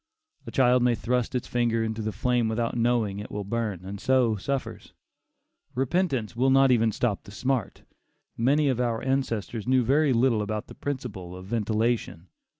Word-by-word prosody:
A - - -5
child 125 -1 +4
may 120 -1 +3
thrust 125 +2 -1
its 125 - -1
finger 115 -2 +1
into 110 0 -3
the 110 0 -2
flame 120 +3 +1
without 115 +1 -1
knowing 115 -4 +1
it 105 - -7
will 105 - -4
burn, 100 -3 -3
and 100 +1 -7
so 130 -4 +3
suffers; 135 +7 -4 0.8
repentance 135 - 0
even 120 - -7
will 135 - +4
not 135 0 +5 0.2
stop 105 -1 -1
the - - -15
smart. 125 +2 -2 0.5
Many 140 +6 +2
of 130 -3 +1
our 115 -2 -1
ancestors 120 -5 -2
knew 130 -1 +4
very 140 +4 +3
little 120 -2 +3
about 105 0 -3
the - - -12
principle 110 -11 -5
of 95 0 -9
ventilation. 110 -4 -1
120 Hz, 170 wpm, -26 LUFS, 110-130 Hz, 0.8 s, not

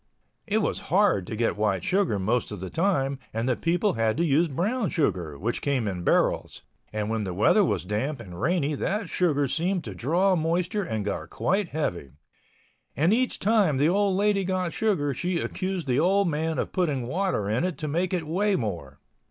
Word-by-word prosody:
It 215 0 +1
was - - -1
hard 185 - +3
to - - -4
get 115 +1 0
white 100 -4 0
sugar 185 - +1
most 110 +5 0
of 105 - -6
the 95 0 -6
time, 140 -7 0
and 115 +2 -2
the 130 - +2
people 175 - +1
had 115 0 0
to 170 - +2
use 160 +3 +3
brown 200 - -1
sugar, 90 - -1
which 115 +9 -2
came 135 -6 0
in 90 -3 -3
barrels, - - +1 0.3
and 105 -1 -2
when 110 -1 -1
the 90 -3 -4
weather 110 - +4
was 165 - -1
damp 115 +9 -2
and 90 -6 -9
rainy 160 -4 +1
that 200 +9 -2
sugar 145 -6 +1
seemed 175 +6 -1
to 105 - -6
draw 175 - +2
moisture 175 +5 0
and 110 - -3
got 105 - -3
quite 195 -1 0
heavy. 90 - -3 0.8
And 160 - +3
each 255 +2 +1
time 200 -9 +2
the 145 +4 +3
old 195 0 +2
lady 205 -1 +2
got 185 -2 -1
sugar 160 -11 0
she 175 +7 -2
accused 185 +1 -3
the 130 0 +1
old 195 +4 +3
man 160 0 -1
of - - -2
putting 150 -9 0
water 175 - -1
in 110 +9 0
it 180 -2 -2
to 155 - -4
make 170 +5 0
it 175 -4 -1
weigh 195 +6 +1
more. 85 - -4
155 Hz, 200 wpm, -26 LUFS, 115-185 Hz, 0.8 s, weather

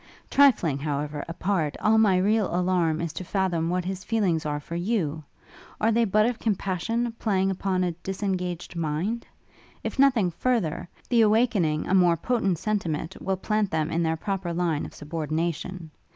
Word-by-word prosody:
'Trifling, 210 - +4
however, 145 0 -3
apart, 165 -3 -1
all 220 +1 +4
my 200 -4 +4
real 205 +2 +2
alarm 175 -3 +1
is 165 -2 -3
to 175 - -5
fathom 175 -3 0
what 180 0 -1
his 190 0 -4
feelings 185 -8 0
are 145 0 -2
for 165 +3 -7
you! 170 -5 -1 0.6
Are 225 - +3
they 230 +1 +3
but 215 +1 +3
of 240 -1 -1
compassion, 220 +3 -1
playing 195 -3 +1
upon 190 -1 0
a 180 - 0
disengaged 180 -1 -4
mind? 170 +8 -2 0.6
If - - -4
nothing 245 -10 +4
further, 175 -5 -1 0.2
the 235 -2 +4
awakening 210 -8 +2
a - - 0
more 175 -3 +5
potent 195 -2 0
sentiment 170 -4 -2
will 190 0 -1
plant 210 +1 0
them 160 -1 -1
in 165 - 0
their 160 -1 0
proper 190 0 -3
line 170 -3 -1
of - - -14
subordination. 160 +2 -3
185 Hz, 165 wpm, -26 LUFS, 165-210 Hz, 0.6 s, more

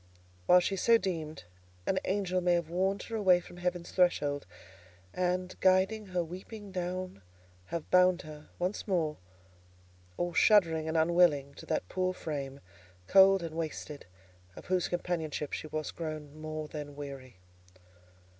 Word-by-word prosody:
While 180 - +7
she 195 +2 -1
so 230 +5 +5
deemed, 160 - -4 0.4
an 190 - +1
angel 185 -2 0
may 175 0 +3
have 170 -2 -2
warned 190 +3 0
her 230 - -6
away 190 -5 +5
from 175 - -13
heaven's 175 -1 -3
threshold, 145 -6 +1 0.7
and, 180 0 -1
guiding 190 +3 +3
her 180 -2 -1
weeping 195 +5 -9
down, 180 - -4 0.4
have 165 - -5
bound 180 0 +5
her, 150 -1 -11
once 180 +5 -2
more, 165 -6 0 1.0
all 175 0 -1
shuddering 165 -5 +4
and 160 +1 0
unwilling, 160 -4 +3
to - - -12
that 90 - -1
poor 185 - -1
frame, 140 -5 -5 0.4
cold 195 - +6
and 165 -1 -5
wasted, 155 - -5 0.5
of - - -11
whose 185 -1 +1
companionship 165 -4 -3
she - - -4
was 155 0 -3
grown 155 -3 -6
more 155 0 -5
than 145 -1 -7
weary. 135 -6 -8
175 Hz, 145 wpm, -31 LUFS, 155-185 Hz, 1.0 s, While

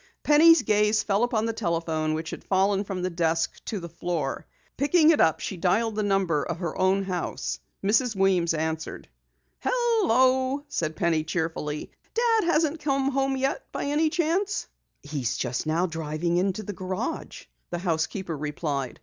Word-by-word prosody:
Penny's 325 +3 +6
gaze 210 0 +2
fell 200 0 +1
upon 230 -3 +1
the 230 - -1
telephone 165 -6 -1
which 160 0 -4
had - - -7
fallen 195 +1 +2
from 190 -3 -4
the 185 - -1
desk 165 -1 -1
to 210 - -3
the 170 - -7
floor. 170 -4 -3 0.3
Picking 310 +4 +4
it 315 - +3
up, 160 - +3
she 190 - -4
dialed 210 +6 +1
the 215 - -1
number 195 -7 +1
of - - -3
her 170 -3 -4
own 190 +1 +2
house. 185 -2 -3 0.2
Mrs. 225 +3 +2
Weems 185 -4 +2
answered. 160 0 -3 0.5
"Hello," 275 - +2
said 160 - -2
Penny 160 -1 +1
cheerfully, 155 -2 -3 0.2
"Dad 455 -3 +3
hasn't 320 -2 +1
come 275 -2 0
home 270 0 0
yet 270 +1 -2
by - - -3
any 295 +3 +1
chance?" 360 +5 0 0.4
"He's 140 -5 -2
just 125 +4 -2
now 165 +3 +2
driving 165 +1 -2
into 195 +3 0
the 205 - -5
garage," 190 - -4 0.2
the 175 - -3
housekeeper 170 0 -2
replied. 145 -3 -3
190 Hz, 160 wpm, -26 LUFS, 165-265 Hz, 0.5 s, Penny's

